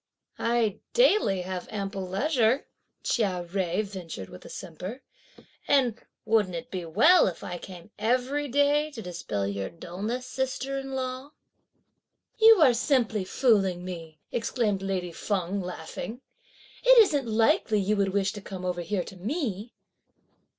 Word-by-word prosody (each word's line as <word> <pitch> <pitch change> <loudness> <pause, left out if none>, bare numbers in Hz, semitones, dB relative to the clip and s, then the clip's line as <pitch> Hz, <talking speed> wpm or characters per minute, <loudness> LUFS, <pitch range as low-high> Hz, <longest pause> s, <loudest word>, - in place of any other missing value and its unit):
"I 230 -3 +1
daily 425 - +4
have 185 0 -5
ample 195 -2 -4
leisure," 250 - +2 0.4
Chia 190 -7 0
Jui 185 +2 0
ventured 180 - -7
with 90 - -12
a - - -11
simper, 185 - -7 0.6
"and 255 -5 +2 0.2
wouldn't 210 -5 +2
it 165 - -6
be 180 -3 -4
well 230 - +5
if 175 - -5
I 175 -1 -5
came 180 +2 -11
every 255 +6 0
day 285 +3 +2
to 230 - -6
dispel 170 - -3
your 100 -1 -3
dulness, 205 +9 -5
sister 265 +1 -3
in 270 0 -7
law?" 260 +2 -4 1.1
"You 445 -4 +8
are 255 -4 +6
simply 235 -4 +1
fooling 190 -5 +2
me," 165 -4 -7
exclaimed 220 -4 0
lady 185 -2 -2
Feng 195 +2 -2
laughing. 180 +7 -6 0.6
"It - - +7
isn't 300 - +5
likely 220 -1 +3
you 200 +2 +1
would 200 -1 +2
wish 200 0 0
to 205 - -8
come 190 -2 -7
over 180 -1 -1
here 180 +2 -1
to - - -11
me?" 220 - -3
210 Hz, 145 wpm, -27 LUFS, 180-255 Hz, 1.1 s, You